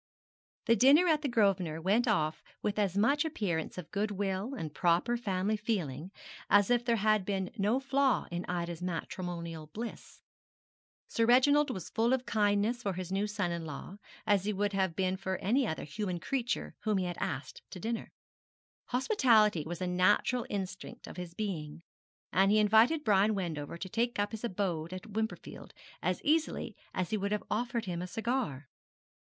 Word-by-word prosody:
The 230 - +5
dinner 275 - +6
at 310 -3 +3
the 295 - -1
Grosvenor 195 - +1
went 205 +8 +2
off 155 -8 +1 0.2
with 210 0 -1
as 200 -2 +1
much 280 +8 +3
appearance 195 - -2
of 180 -4 -7
goodwill 205 +3 -2
and 160 - -5
proper 175 +9 +2
family 205 -2 0
feeling 190 - -2 0.4
as 205 +2 +5
if 240 -1 +3
there 235 -1 +2
had 215 -1 +2
been 190 -1 -2
no 215 +4 +1
flaw 270 -2 +2
in 175 +1 -3
Ida's 170 -1 -3
matrimonial 170 -2 -4
bliss. 225 +9 -8 0.8
Sir 230 0 +1
Reginald 285 +4 +5
was 185 -4 -5
full 230 +3 +2
of 260 -1 0
kindness 210 +3 +1
for 200 -4 -1
his 185 0 -5
new 200 +2 0
son 205 -4 -1
in 170 -1 -3
law: 160 +5 -7 0.3
as 205 -2 +3
he 210 - 0
would 205 +1 -1
have 190 -3 0
been 185 +1 0
for 190 0 -3
any 240 +7 +1
other 160 - -3
human 180 +4 -3
creature 245 +5 -2
whom 215 -2 0
he 185 - 0
had 175 -1 -4
asked 135 -1 -4
to 185 - -8
dinner. 225 +4 -3 0.7
Hospitality 235 - +3
was 175 +2 -5
a - - -1
natural 205 +7 +2
instinct 190 -2 -5
of - - -10
his 175 -1 -7
being, 170 -7 -4 0.5
and 195 +1 +4
he 210 - +4
invited 220 +9 +5
Brian 210 -2 +3
Wendover 165 -5 -4
to 190 - -5
take 235 +5 -1
up 205 0 0
his 220 0 -7
abode 180 -6 -2
at 185 +4 -8
Wimperfield 220 +1 -4 0.3
as - - -1
easily 315 +1 0 0.2
as 185 -2 -2
he 215 - +1
would 200 0 -2
have 210 - -1
offered 235 +1 -1
him 175 -2 -3
a 180 - -4
cigar. 220 - -2
205 Hz, 175 wpm, -31 LUFS, 180-230 Hz, 0.8 s, dinner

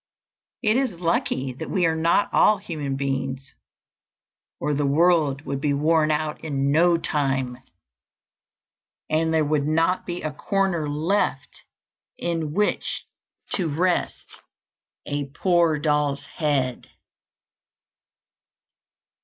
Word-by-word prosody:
It 215 +1 +3
is 250 -10 -1
lucky 135 -6 0
that 160 +6 -7
we 185 -4 +1
are 160 -1 +2
not 165 +5 +2
all 215 - +5
human 155 -8 -4
beings, 135 -1 -3 1.1
or 150 - -1
the 145 +1 0
world 150 -1 +3
would 140 -1 -4
be 145 -1 +1
worn 155 +1 +2
out 150 0 -1
in 140 -3 0
no 170 +3 +4
time, 135 -5 -1 1.5
and 160 +1 +2
there 160 -1 +2
would 145 -1 0
not 165 +4 +1
be 175 0 -4
a 155 - -2
corner 180 -2 0
left 150 -3 -1 0.6
in 165 -3 -2
which 210 +6 -1 0.5
to 175 -5 -1
rest 175 +4 -1 0.6
a 145 0 -2
poor 170 +2 +2
doll's 145 -2 0
head." 140 -6 -1
155 Hz, 110 wpm, -24 LUFS, 140-170 Hz, 1.5 s, all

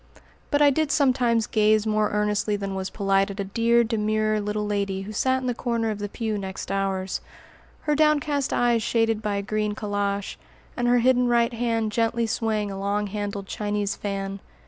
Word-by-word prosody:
But 290 0 +3
I 285 - +6
did 310 +1 0
sometimes 250 -5 +2
gaze 215 0 +3
more 215 -1 +1
earnestly 210 0 0
than 200 -1 -4
was 190 0 -3
polite 195 -1 +1
at 200 +1 -7
a - - 0
dear, 230 +4 +2
demure 215 -1 0
little 210 +1 -2
lady 200 -2 -1
who 205 - -7
sat 260 +4 +1
in - - -5
the 250 - 0
corner 230 -2 -1
of 210 - -5
the 205 0 -4
pew 220 -1 -3
next 190 0 -6
ours, 195 -1 -1 0.6
her 300 - 0
downcast 295 -2 +2
eyes 240 -1 +2
shaded 225 -1 +1
by 210 -2 -1
a 200 - -2
green 210 0 -1
calash, 205 -1 -2 0.4
and 245 -1 0
her 245 0 +4
hidden 250 +1 +3
right 235 0 +2
hand 230 -2 0
gently 230 +1 +1
swaying 220 -2 -1
a 195 - -6
long 200 +1 0
handled 205 -1 -4
Chinese 205 0 -2
fan. 195 -1 -4
215 Hz, 190 wpm, -25 LUFS, 200-235 Hz, 0.6 s, I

